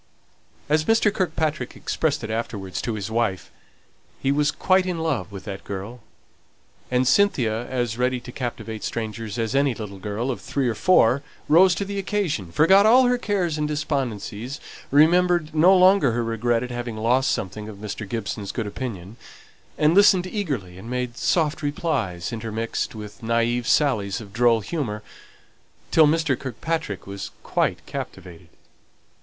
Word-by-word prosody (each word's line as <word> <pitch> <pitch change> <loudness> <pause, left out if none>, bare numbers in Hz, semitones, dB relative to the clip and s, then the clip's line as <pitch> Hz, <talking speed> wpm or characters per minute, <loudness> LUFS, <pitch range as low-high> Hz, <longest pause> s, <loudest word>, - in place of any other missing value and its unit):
As 155 +1 +2
Mr. 225 0 +3
Kirkpatrick 160 -6 -1
expressed 155 -6 -1
it 110 - -4
afterwards 105 -4 -4
to 115 - -3
his 105 0 -5
wife, 110 -5 -1 0.7
he 135 - +1
was 145 +1 +2
quite 185 +4 +2
in 180 -2 -2
love 140 - -2
with 95 -1 -8
that 100 -2 -7
girl; 100 +5 -6 0.9
and 125 0 +2
Cynthia, 125 - +2
as 120 -3 -2
ready 125 0 +1
to 125 - -10
captivate 115 -3 -5
strangers 115 -1 -4
as 115 +1 -1
any 140 -2 +2
little 100 -3 -7
girl 105 +6 -2
of 125 - -6
three 135 -3 -1
or 120 - +1
four, 130 - +4 0.3
rose 175 +4 +6
to 200 - -2
the 200 0 -4
occasion, 175 - -2
forgot 190 - +5
all 250 +4 +7
her 250 0 +2
cares 180 -9 -1
and 150 - 0
despondencies, 135 -5 -3 0.3
remembered 170 +2 +4
no 175 +5 +6
longer 185 - +5
her 120 0 0
regret 115 +1 0
at 125 - -6
having 120 -2 -4
lost 125 +4 +2
something 105 +2 -4
of 105 - -9
Mr. 105 0 -6
Gibson's 105 -3 -4
good 115 - -3
opinion, 105 -2 -6 0.6
and 150 +2 +4
listened 190 -2 +5
eagerly 140 - -4
and 115 - -9
made 125 -1 -3
soft 155 +2 +1
replies, 140 - -2
intermixed 115 0 -3
with 105 -1 -9
naĽve 115 +1 0
sallies 110 -8 +2
of 100 -3 -11
droll 115 -1 +3
humour, 105 -3 -4 0.9
till 160 -2 +6
Mr. 155 -4 +1
Kirkpatrick 130 - -4
was 100 0 -6
quite - - -1
captivated. 85 -2 -8
125 Hz, 155 wpm, -23 LUFS, 110-155 Hz, 0.9 s, all